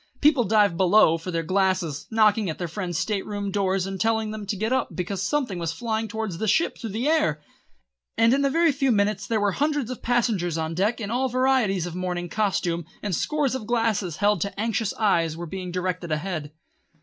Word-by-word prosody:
People 285 -5 +4
dived 205 -4 +3
below 185 -3 +5
for 165 - -7
their 165 -2 -1
glasses, 185 -4 0
knocked 220 -1 +4
at 185 -7 -3
their 175 - -3
friends' 175 -1 -4
state 205 0 -1
room 205 -1 -4
doors 190 -1 0
and 195 -1 -5
told 220 -1 +1
them 210 -2 -7
to 205 - -1
get 220 +5 -1
up 260 - -1
because 185 +1 -3
something 225 -4 -1
was 165 -1 -2
flying 220 +4 -2
towards 220 -5 -4
the 220 - -1
ship 325 - +2
through 230 - -6
the 225 +7 -2
air; 305 - +2 0.8
and 230 +1 +5
in 280 +1 +2
a 275 - +3
very 330 +3 +3
few 270 -1 +1
minutes 205 -1 +1
there 225 -2 +1
were 205 -1 +2
hundreds 290 +1 -1
of 255 - -7
passengers 215 -9 0
on 160 0 -2
deck 205 +8 0
in 210 -2 -4
all 260 +2 0
varieties 250 -8 +2
of 175 - -6
early 180 - -5
morning 175 -1 -3
costume, 175 -5 0 0.2
and 205 -3 -2
scores 295 - 0
of 245 -5 -4
glasses, 225 -7 0
held 205 0 +2
to 200 0 -3
anxious 225 -1 0
eyes, 165 -7 +1
were 175 - -5
being 180 +1 -6
directed 180 -1 -3
ahead. 155 -2 -3
205 Hz, 215 wpm, -25 LUFS, 180-230 Hz, 0.8 s, below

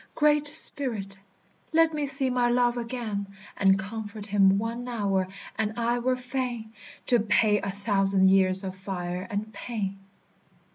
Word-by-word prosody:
"Great 300 -1 +3
Spirit! 230 -9 +3 0.6
Let 325 0 +4
me 295 -2 -2
see 270 -1 0
my 245 -1 +1
love 240 0 +2
again 230 -4 -4 0.3
And 195 -1 +3
comfort 205 +1 -7
him 195 -2 +3
one 230 +3 -4
hour, 200 -6 -1 0.3
and 220 0 -2
I 240 +1 0
were 255 +1 0
fain 250 -3 -5 0.3
To 240 - +3
pay 210 -1 +2
a - - -3
thousand 195 -1 +3
years 190 0 +3
of 190 -1 -5
fire 185 -1 -5
and 215 +1 -4
pain." 200 -5 -5
220 Hz, 145 wpm, -26 LUFS, 195-245 Hz, 0.6 s, Let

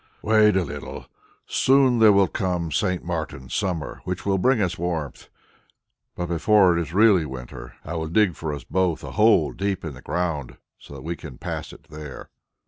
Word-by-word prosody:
"Wait 110 -1 +4
a 95 - +2
little; 75 -3 -7 0.4
soon 130 -2 +3
there 110 -1 +7
will 100 -1 +4
come 90 -2 -2
St. 90 +4 0
Martin's 80 -6 -5
summer 85 -6 -2
which 90 0 -4
will 95 -1 +1
bring 130 +5 +3
us 95 -4 0
warmth. 80 -5 -4 0.9
Before 90 +2 +3
it 85 - +1
is 80 -1 -6
really 100 -2 +5
winter, 65 -4 -8
I 80 - -5
will 80 -1 -3
dig 95 +2 +2
for 80 -1 -5
us 70 -3 -6
both 90 0 0
a - - -7
hole - - +4
deep 100 -3 -3
in 80 - -5
the 65 - -12
ground, 85 -7 -3 0.2
so 70 - -12
that 65 - -9
we 85 +2 -3
can 75 -6 -10
pass - - -5
it - - -15
there." 75 -3 -9
85 Hz, 185 wpm, -24 LUFS, 75-95 Hz, 0.9 s, there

